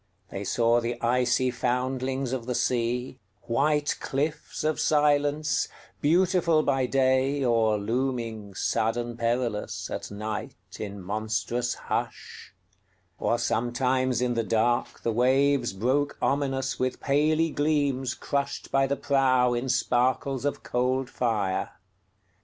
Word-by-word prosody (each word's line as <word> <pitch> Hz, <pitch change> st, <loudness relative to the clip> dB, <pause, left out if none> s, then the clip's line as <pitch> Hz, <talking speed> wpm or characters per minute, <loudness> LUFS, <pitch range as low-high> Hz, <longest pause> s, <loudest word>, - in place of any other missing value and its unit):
They 100 Hz, -, -4 dB
saw 115 Hz, +3 st, +2 dB
the 120 Hz, +1 st, -3 dB
icy 125 Hz, +1 st, +2 dB
foundlings 130 Hz, +1 st, -1 dB
of 125 Hz, -2 st, -4 dB
the 125 Hz, -, -1 dB
sea, 125 Hz, +2 st, -1 dB, 0.2 s
White 145 Hz, +5 st, +1 dB
cliffs 150 Hz, +3 st, -3 dB
of 155 Hz, 0 st, 0 dB
silence, 150 Hz, 0 st, +2 dB, 0.3 s
beautiful 170 Hz, 0 st, +3 dB
by 135 Hz, -2 st, +1 dB
day, 135 Hz, +1 st, +2 dB
Or 115 Hz, -3 st, +3 dB
looming, 115 Hz, -2 st, -3 dB
sudden 120 Hz, +4 st, -1 dB
perilous, 115 Hz, -2 st, -2 dB
at -, -, -5 dB
nightIn 105 Hz, -1 st, -6 dB
monstrous 110 Hz, +4 st, -2 dB
hush; -, -, -5 dB, 0.7 s
or 120 Hz, -, +1 dB
sometimes 125 Hz, +2 st, 0 dB
in 125 Hz, -1 st, +1 dB
the 115 Hz, -1 st, 0 dB
darkThe 115 Hz, +1 st, 0 dB
waves 130 Hz, +2 st, +3 dB
broke 130 Hz, +9 st, 0 dB
ominous 135 Hz, -1 st, 0 dB
with 130 Hz, 0 st, -1 dB
paly 155 Hz, +3 st, +2 dB
gleamsCrushed 140 Hz, -1 st, -1 dB
by 135 Hz, 0 st, +3 dB
the 140 Hz, +1 st, -1 dB
prow 130 Hz, -3 st, +3 dB
in 120 Hz, +2 st, -2 dB
sparkles 125 Hz, +2 st, +1 dB
of 145 Hz, -, -2 dB
cold 130 Hz, +1 st, 0 dB
fire. 100 Hz, -6 st, -1 dB
125 Hz, 110 wpm, -27 LUFS, 120-140 Hz, 0.7 s, beautiful